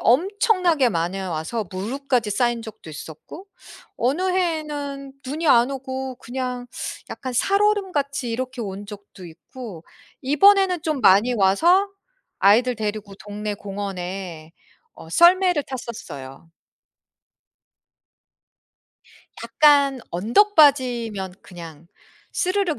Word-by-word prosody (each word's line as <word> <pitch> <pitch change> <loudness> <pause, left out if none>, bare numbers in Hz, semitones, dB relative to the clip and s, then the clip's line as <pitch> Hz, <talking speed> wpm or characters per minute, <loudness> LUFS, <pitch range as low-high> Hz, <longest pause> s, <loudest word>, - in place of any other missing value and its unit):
엄청나게 355 - +2
많이 175 0 -2
와서 190 +4 -3
무릎까지 235 +3 -2
쌓인 240 +1 0
적도 220 -7 -11
있었고 160 - -10 0.5
어느 275 +9 0
해에는 295 -6 -3
눈이 305 +4 -2
안 240 +1 +5
오고 265 -1 -5
그냥 250 0 -5 0.4
약간 255 - -6
살얼음같이 370 - 0
이렇게 255 +1 -4
온 200 -1 -6
적도 200 -2 -12
있고 175 +1 -11 0.4
이번에는 365 +5 +4
좀 310 -5 -2
많이 215 +4 +5
와서 335 - +3 0.5
아이들 235 +5 +4
데리고 210 -2 -4
동네 210 0 -5
공원에 190 -5 -6 0.4
어 - - -13
썰매를 355 - +4
탔었어요. 165 - -8 2.9
약간 280 -3 +4
언덕바지면 240 - +2
그냥 170 -3 -11 0.5
스르륵 370 -4 0
245 Hz, 225 characters per minute, -22 LUFS, 200-300 Hz, 2.9 s, 안